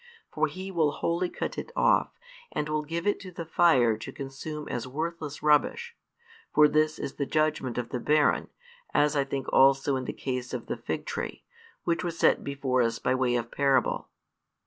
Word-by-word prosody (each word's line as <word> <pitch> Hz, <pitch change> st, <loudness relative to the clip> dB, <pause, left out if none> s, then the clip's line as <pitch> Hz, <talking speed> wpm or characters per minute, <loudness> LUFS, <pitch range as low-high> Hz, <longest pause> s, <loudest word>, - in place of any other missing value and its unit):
For -, -, +1 dB
He 190 Hz, +1 st, -7 dB
will 160 Hz, -5 st, +2 dB
wholly 170 Hz, +4 st, -1 dB
cut -, -, -4 dB
it -, -, -7 dB
off, -, -, +2 dB, 0.3 s
and 150 Hz, -, -2 dB
will 155 Hz, 0 st, 0 dB
give 165 Hz, +3 st, -4 dB
it 205 Hz, -, +1 dB
to 190 Hz, -, -9 dB
the 170 Hz, -1 st, -6 dB
fire 135 Hz, -9 st, +4 dB
to -, -, -7 dB
consume 145 Hz, +3 st, -6 dB
as 120 Hz, 0 st, -3 dB
worthless 155 Hz, +1 st, -4 dB
rubbish; 465 Hz, -, +2 dB, 0.6 s
for 150 Hz, 0 st, +6 dB
this 155 Hz, +1 st, +2 dB
is 135 Hz, -, -6 dB
the 140 Hz, -, -1 dB
judgment 155 Hz, -5 st, 0 dB
of 120 Hz, -1 st, -2 dB
the 125 Hz, -, -3 dB
barren, 150 Hz, +3 st, +2 dB, 0.5 s
as 150 Hz, +1 st, +3 dB
I 140 Hz, -, +3 dB
think 135 Hz, -1 st, -4 dB
also 135 Hz, +1 st, +5 dB
in 130 Hz, -, -4 dB
the -, -, -2 dB
case 125 Hz, -2 st, -4 dB
of -, -, -5 dB
the -, -, -3 dB
fig -, -, -4 dB
tree, -, -, -5 dB, 0.4 s
which 170 Hz, -1 st, 0 dB
was 170 Hz, -2 st, -3 dB
set -, -, +3 dB
before 135 Hz, -2 st, 0 dB
us 115 Hz, -1 st, +1 dB
by 125 Hz, -, 0 dB
way 130 Hz, -1 st, +1 dB
of 115 Hz, -1 st, -2 dB
parable. 135 Hz, -3 st, +1 dB
150 Hz, 190 wpm, -28 LUFS, 130-165 Hz, 0.6 s, for